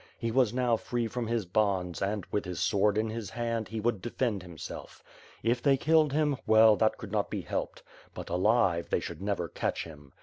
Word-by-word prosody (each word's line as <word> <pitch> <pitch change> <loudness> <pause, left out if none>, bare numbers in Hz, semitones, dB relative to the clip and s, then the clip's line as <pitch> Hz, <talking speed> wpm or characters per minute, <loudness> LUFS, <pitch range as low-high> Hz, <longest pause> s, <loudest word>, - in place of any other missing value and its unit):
He 115 -2 -2
was 125 -2 +3
now 125 -2 +1
free 120 +1 -2
from 120 +1 -4
his 115 -3 -1
bonds 90 -2 0
and, 100 -1 -1
with 105 - 0
his 90 -1 -5
sword 100 +1 +2
in 110 0 0
his 110 -4 -5
hand, 115 0 -2
he 110 - -5
would 110 -3 0
defend 120 -3 -1
himself. 85 -4 -9 0.4
If 120 +1 +1
they 140 0 +4
killed 155 +1 +3
him, 150 -1 +1
well, 110 0 +7
that 110 -1 +2
could 105 - -9
not 105 -2 0
be - - -3
helped; - - -4 0.3
but, - - -7
alive, 90 -2 +2
they - - +1
should - - -7
never 100 -4 -1
catoh - - -2
him. 75 -4 -13
110 Hz, 205 wpm, -29 LUFS, 95-120 Hz, 0.4 s, well